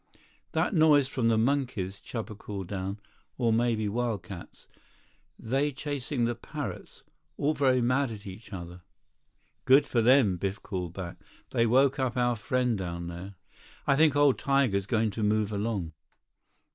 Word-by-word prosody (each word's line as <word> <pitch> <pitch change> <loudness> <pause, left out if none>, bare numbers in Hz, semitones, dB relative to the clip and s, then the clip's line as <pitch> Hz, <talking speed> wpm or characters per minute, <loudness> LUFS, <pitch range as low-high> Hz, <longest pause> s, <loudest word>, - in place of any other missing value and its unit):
"That - - +1
noise 155 -5 +5
from 130 -4 0
the 115 -1 +3
monkeys," 115 -6 0
Chuba 110 -2 -5
called 100 -3 -6
down. 100 +1 -4 0.4
"Or 115 -3 +2
maybe 115 -2 +1
wildcats. 105 -5 -4 0.7
They 135 +6 0
chasing 140 -2 -2
the 120 - 0
parrots. 115 - -7 0.3
All 150 +2 +1
very 130 -3 +3
much 130 +3 +2
mad - - -7
at 105 -2 -9
each 100 +4 -10
other." 90 -2 -8 0.8
"Good 135 +2 +6
for 120 -3 +1
them," 120 -6 +5
Biff 95 +3 -3
called 90 -4 -4
back. 90 -2 -6 0.3
"They 115 0 +2
woke 135 +4 +3
up 130 -1 -1
our 120 -1 +2
friend 125 +2 0
down 85 -3 -4
there. 90 +3 -8 0.5
I 140 - +4
think 155 0 +4
old 145 -2 +4
tiger's 130 -9 +1
going 110 -1 +1
to 110 - -5
move 105 0 +1
along." 100 -5 -2
115 Hz, 155 wpm, -28 LUFS, 100-130 Hz, 0.8 s, Good